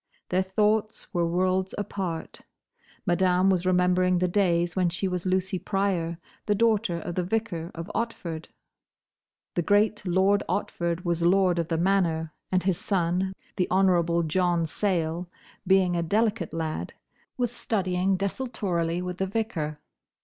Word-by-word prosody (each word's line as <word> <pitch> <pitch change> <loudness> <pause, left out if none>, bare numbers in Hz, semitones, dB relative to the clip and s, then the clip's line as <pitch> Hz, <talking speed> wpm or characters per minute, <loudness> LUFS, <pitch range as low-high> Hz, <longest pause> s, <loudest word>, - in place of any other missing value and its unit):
Their 185 +1 +2
thoughts 210 +4 0
were 170 -2 +1
worlds 185 +2 0
apart. 185 -5 -4 0.6
Madame 185 +1 +3
was 185 -1 0
remembering 180 0 +3
the 180 +1 +2
days 175 -3 +1
when 180 -2 +2
she 175 +3 -2
was 180 0 -2
Lucy 185 0 0
Pryor, 185 -5 -1 0.3
the 210 - +3
daughter 215 -5 +2
of 175 - -5
the 180 - -1
vicar 180 -4 -2
of 165 0 -5
Otford. 170 -8 -3 1.1
The - - +1
great 210 +4 +2
Lord 190 +2 +3
Otford 170 -3 -2
was 170 -1 0
Lord 180 0 +3
of 165 - -1
the 165 - 0
Manor, 165 -3 +1 0.2
and 185 -1 +2
his 185 -1 +1
son, 190 -1 0 0.2
the 180 - +1
Honourable 175 -3 +3
John 175 +1 +1
Sayle, 170 -1 -1 0.4
being 190 -2 +4
a 170 - +1
delicate 215 +5 0
lad, 160 -1 -3 0.4
was 245 -2 0
studying 190 -5 0
desultorily 185 -5 -1
with 180 0 -5
the 190 - 0
Vicar. 185 -8 -2
180 Hz, 140 wpm, -26 LUFS, 170-195 Hz, 1.1 s, being